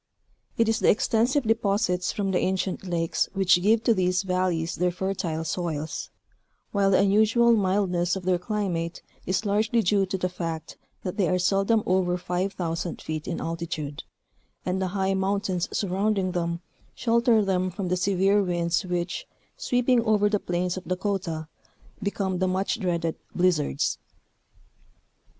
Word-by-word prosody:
It 230 - +3
is 225 0 +1
the - - +3
extensive 240 +6 +2
deposits 205 -5 +1
from 195 -2 -1
the 180 - +2
ancient 190 0 -1
lakes 165 -2 0
which 190 -2 +4
give 220 +4 +3
to 230 - +4
these 185 -1 +1
valleys 180 -3 0
their 180 +1 +1
fertile 180 -3 -2
soils, 160 -2 -3 0.6
while 200 -1 +2
the 190 - +4
unusual 220 +4 +4
mildness 185 -3 +1
of 190 - -5
their 180 -1 +2
climate 180 -4 -3 0.2
is 185 +3 0
largely 215 +3 +2
due 195 +1 +2
to 190 - -2
the 185 - 0
fact 165 -3 -5 0.3
that 185 +1 -4
they 195 -4 +2
are 180 - +2
seldom 195 +4 +2
over 180 -1 +1
5,000 175 -2 -3
feet 155 -1 -5
in - - -3
altitude, 160 -3 -4 0.6
and 185 +1 -1
the 190 - 0
high 190 0 +1
mountains 190 -2 -1
surrounding 195 0 0
them 170 -1 -2 0.3
shelter 230 -2 +3
them 185 -1 +1
from 185 0 -4
the 180 - +2
severe 195 +2 +2
winds 175 -1 0
which, 175 -1 -3 0.3
sweeping 245 0 +2
over 210 -2 +3
the 210 -1 +1
plains 180 0 -2
of 185 - -7
Dakota, 185 -4 -2 0.5
become 195 -2 -1
the 185 - +2
much 190 +4 -1
dreaded 170 -4 -1
" - - -31
blizzards." 170 -6 +1
185 Hz, 150 wpm, -26 LUFS, 175-200 Hz, 0.6 s, which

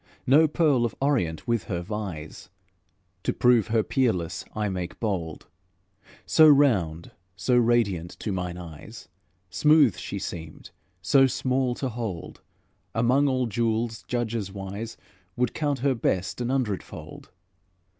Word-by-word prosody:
No 150 +5 +6
pearl 150 -5 +2
of 120 - -2
Orient 120 - 0
with 115 -7 0
her 85 0 -3
vies; 95 -5 -6 0.7
To - - 0
prove 120 -3 +3
her 110 -1 +2
peerless 110 -12 0
I 105 -1 -1
make 90 -2 -4
bold: 90 -8 -3 0.8
So 130 - +6
round, 95 - +3 0.2
so 125 +7 +1
radiant 115 -8 +2
to 105 - -2
mine 90 -2 -3
eyes, 90 +6 -10 0.4
smooth 150 - +4
she 100 - -5
seemed, 80 -5 -7 0.3
so 135 +8 +5
small 130 -1 0
to 130 - -3
hold, 110 -7 -6 0.5
Among 125 +5 +3
all 130 -2 +1
jewels 115 0 -1
judges 115 -4 -2
wise 100 +3 -6 0.4
Would 125 -1 0
count 145 -4 -1
her 140 - +4
best 105 -2 -1
an 120 - -1
hundred 125 -8 0
fold. - - -11
115 Hz, 135 wpm, -26 LUFS, 95-130 Hz, 0.8 s, No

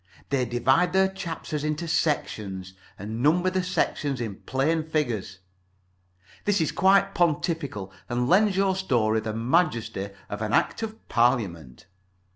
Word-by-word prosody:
They 135 -2 +1
divide 130 +9 +2
their 190 0 +4
chapters 165 -5 -5
into 155 +2 -2
sections, 100 - -1 0.2
and 110 +4 -5
number 175 +6 +3
the 185 0 +1
sections 145 -6 -1
in 110 -5 -4
plain 155 +5 0
figures. 120 -12 -2 1.1
This 205 -1 +2
is 160 - +1
quite 195 +1 +4
pontifical, 155 - -1 0.2
and 125 0 0
lends 195 +4 +4
your 195 -1 +2
story 115 -12 +1
the 110 0 -4
majesty 115 - 0 0.2
of 105 - -6
an 105 0 -2
Act - - +2
of 220 0 -6
Parliament. 95 - 0
140 Hz, 135 wpm, -26 LUFS, 110-175 Hz, 1.1 s, their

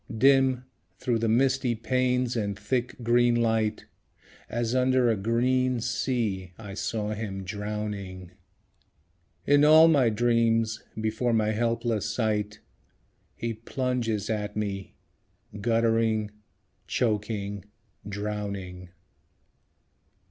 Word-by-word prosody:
Dim, 130 0 +4 0.3
through 120 -3 0
the 115 - 0
misty 130 +1 +2
panes 125 +1 0
and 100 -3 -2
thick 120 +4 -2
green 120 +1 +3
light, 110 -2 0 0.6
As 120 0 -1
under 130 -1 +3
a - - +1
green 125 +4 +1
sea, 115 -6 -2
I 105 -3 -8
saw 105 +1 -2
him 105 -3 -4
drowning. 100 -2 -5 1.1
In 145 +1 +5
all 155 +2 +8
my 140 -7 +4
dreams, 115 0 +1 0.2
before 110 +2 0
my 110 -1 +2
helpless 115 -1 0
sight, 105 -2 -1 0.7
He 115 0 -3
plunges 115 -2 -2
at 105 -1 -3
me, 100 -2 -4 0.7
guttering, 115 -1 +1 0.6
choking, 105 -3 -2 0.4
drowning. 100 -3 -5
115 Hz, 100 wpm, -27 LUFS, 105-120 Hz, 1.1 s, all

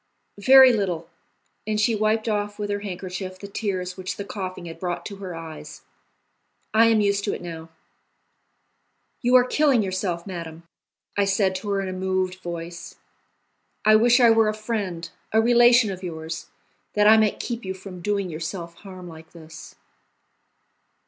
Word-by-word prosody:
"Very 260 +3 +8
little;" 175 -6 -2 0.6
and 215 -1 0
she 220 +2 +2
wiped 215 +1 0
off 205 -1 -1
with 205 -1 -3
her 205 - -1
handkerchief 185 -1 -6
the 200 - -9
tears 185 -3 -3
which 185 -1 -5
the 200 - -5
coughing 185 -3 -6
had 165 -1 -9
brought 175 -1 -4
to 200 - -7
her 185 -3 -7
eyes; 165 -1 -9 0.9
"I 225 +1 +6
am 225 -2 +4
used 200 0 +1
to 205 - -1
it - - -9
now." 165 -1 -8 1.5
"You 245 +1 +3
are 250 - +8
killing 265 -2 +2
yourself, 185 -3 -3
madame," 170 -3 -7 0.5
I 200 - +2
said 195 -1 +1
to 205 +2 -7
her 200 -1 0
in 195 - -4
a 185 - -4
moved 185 0 -2
voice. 170 -1 -7 0.9
"I 215 0 +7
wish 240 +3 +5
I 235 -2 +6
were 225 -1 +4
a 215 - -2
friend, 210 -6 -4 0.3
a 220 - +5
relation 240 -1 +5
of 185 -1 -7
yours, 160 -2 -6 0.5
that 210 0 +3
I 220 - +8
might 215 -2 +2
keep 235 -1 -4
you 190 0 -4
from 185 -1 -10
doing 200 0 -1
yourself 170 +1 -6
harm 185 -3 -11
like 160 -1 -13
this." 160 -1 -12
195 Hz, 170 wpm, -24 LUFS, 175-215 Hz, 1.5 s, Very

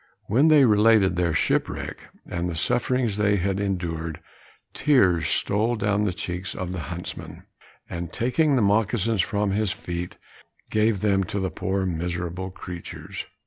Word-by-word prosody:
When 130 +9 +3
they 150 -4 +7
related 105 -4 +4
their 85 -3 +1
shipwreck, - - -1 0.2
and 85 0 -3
the 85 - -4
sufferings 120 +4 +1
they 105 0 +3
had 95 +1 0
endured, 85 -5 -3 0.5
tears 100 - +3
stole 110 +4 +1
down 105 -1 +1
the 100 - +1
cheeks 90 +1 -4
of 90 -1 -4
the 90 - -4
huntsman, 85 0 -7 0.4
and, 85 -1 -5
taking 140 +5 +2
the 120 - +3
moccasins 105 0 +2
from 105 +2 0
his 105 -1 0
feet, 85 0 -5 0.5
gave 110 -2 +2
them 100 -2 +2
to 100 - -3
the 95 -2 -2
poor 95 +4 -1
miserable 90 +1 -3
creatures. 90 -2 -8
100 Hz, 145 wpm, -25 LUFS, 90-110 Hz, 0.5 s, they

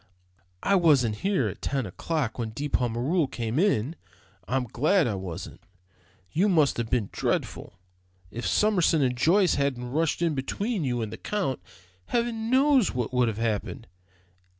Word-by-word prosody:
I 200 - +2
wasn't 140 - +4
here 195 - 0
at - - -7
ten 135 -3 -1
o'clock 125 - -3
when 115 -2 -2
De 145 - -3
Pommereul 130 +6 0
came 120 +1 -3
in. 165 - +1 0.5
I'm 130 +1 0
glad 150 - +2
I 110 - -1
wasn't. 95 -4 -7 0.7
You 195 +6 +2
must 155 -6 +3
have 115 -1 -2
been 115 -6 0
dreadful. 100 - -3 0.5
If 120 - -4
Summerson 180 -8 +3
and 125 -1 +1
Joyce 175 +8 +3
hadn't 125 -3 -2
rushed 160 +3 0
in 165 -2 +1
between 195 - -2
you 120 -3 -1
and 110 - -6
the - - -6
Count, 185 - -2 0.5
heaven 235 -1 -1
knows 265 - +3
what 125 -1 -2
would 125 -1 +3
have 110 -2 -2
happened. 115 +1 -2
140 Hz, 155 wpm, -26 LUFS, 120-185 Hz, 0.7 s, wasn't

